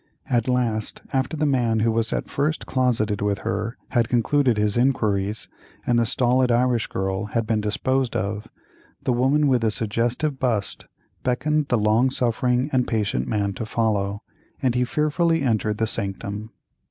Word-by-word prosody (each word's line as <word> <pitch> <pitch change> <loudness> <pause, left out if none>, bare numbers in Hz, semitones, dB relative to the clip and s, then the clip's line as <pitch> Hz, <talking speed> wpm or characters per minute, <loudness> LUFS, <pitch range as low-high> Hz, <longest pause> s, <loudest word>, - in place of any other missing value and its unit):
At 120 -1 +1
last, 120 -4 -1
after 130 +3 0
the 150 - +1
man 120 -6 +2
who 115 +1 +2
was 115 0 0
at - - -2
first 150 +3 -1
closeted 115 -6 0
with 100 -1 +1
her 105 +5 -2
had 120 -2 +1
concluded 125 0 +2
his 105 -1 +1
inquiries, 110 -5 0 0.4
and 120 -1 +3
the 115 - +2
stolid 125 +1 +2
Irish 120 -1 +2
girl 95 +2 -2
had 115 +2 -1
been 110 -1 0
disposed 130 +4 0
of, 100 +3 -2 0.6
the 125 - +1
woman 135 +5 +3
with 125 -3 +3
the 115 - +2
suggestive 120 +7 -1
bust 115 -6 -1 0.4
beckoned 150 +4 0
the 125 - +2
long 110 +4 +3
suffering 125 +1 0
and 125 -1 +2
patient 100 - -1
man 100 -2 0
to 95 - -5
follow, 105 -3 -1 0.4
and 130 -2 +1
he 125 0 +1
fearfully 155 +3 +1
entered 110 -4 0
the 110 - +1
sanctum. 100 0 -2
115 Hz, 165 wpm, -23 LUFS, 105-130 Hz, 0.6 s, and